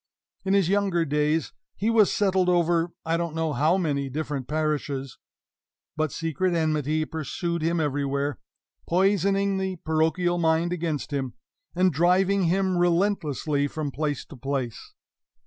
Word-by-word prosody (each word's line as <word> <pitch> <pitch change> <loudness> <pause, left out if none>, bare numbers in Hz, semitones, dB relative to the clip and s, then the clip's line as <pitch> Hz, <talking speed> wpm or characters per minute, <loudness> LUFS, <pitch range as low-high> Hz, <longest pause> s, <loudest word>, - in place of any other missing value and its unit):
In 195 0 +2
his 195 -4 +3
younger 195 -3 +1
days 150 +1 0 0.2
he 220 +3 0
was 220 -3 +5
settled 190 -3 +2
over 170 -1 +2 0.2
I 165 +1 +1
don't 170 -2 -3
know 160 -2 -1
how 155 +7 +3
many 140 -6 -1
different 145 -2 -4
parishes; 145 -3 -2 0.8
but 155 -2 0
secret 165 +3 -1
enmity 155 -1 0
pursued 165 +2 -3
him 165 +1 +1
everywhere, 140 -2 -1 0.5
poisoning 195 +2 +2
the 190 -1 -2
parochial 160 +3 +1
mind 165 +1 +2
against 160 -4 -3
him, 135 -3 -2 0.4
and 185 -1 +3
driving 185 +4 +3
him 185 +1 +1
relentlessly 170 -5 +1
from 150 -1 -4
place 145 0 -2
to - - -12
place. 130 -2 -4
160 Hz, 135 wpm, -25 LUFS, 150-180 Hz, 0.8 s, was